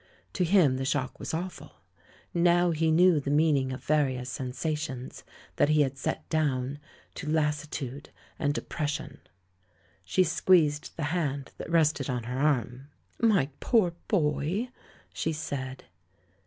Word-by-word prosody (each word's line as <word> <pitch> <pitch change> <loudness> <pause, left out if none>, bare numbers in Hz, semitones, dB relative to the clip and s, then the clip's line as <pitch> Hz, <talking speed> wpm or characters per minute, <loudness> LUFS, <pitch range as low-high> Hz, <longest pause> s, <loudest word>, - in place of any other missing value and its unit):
To 185 - +1
him 170 -7 +4
the 135 - -2
shock 135 -1 -1
was - - -4
awful. 175 +3 -5 0.6
Now 175 0 +4
he 160 0 +1
knew 170 0 +5
the 140 - -4
meaning 145 -3 +3
of 130 - -6
various 130 -4 +1
sensations 135 0 -4 0.3
that 145 - +4
he 155 0 +4
had 135 -2 +1
set 135 - -3
down 140 -3 0 0.3
to 150 - -6
"lassitude" 150 -3 -2 0.3
and 145 - +1
"depression"! 150 -1 -4 0.8
She 95 - +2
squeezed 160 -5 +2
the 160 - -2
hand 145 -6 -2
that - - -6
rested 155 -4 +2
on 125 -2 -2
her 125 +3 -4
arm. 135 -2 0 0.3
"My 205 - +3
poor 200 -8 +2
boy!" 175 - 0 0.4
she 160 - -1
said. 135 -4 -5
150 Hz, 135 wpm, -28 LUFS, 135-165 Hz, 0.8 s, knew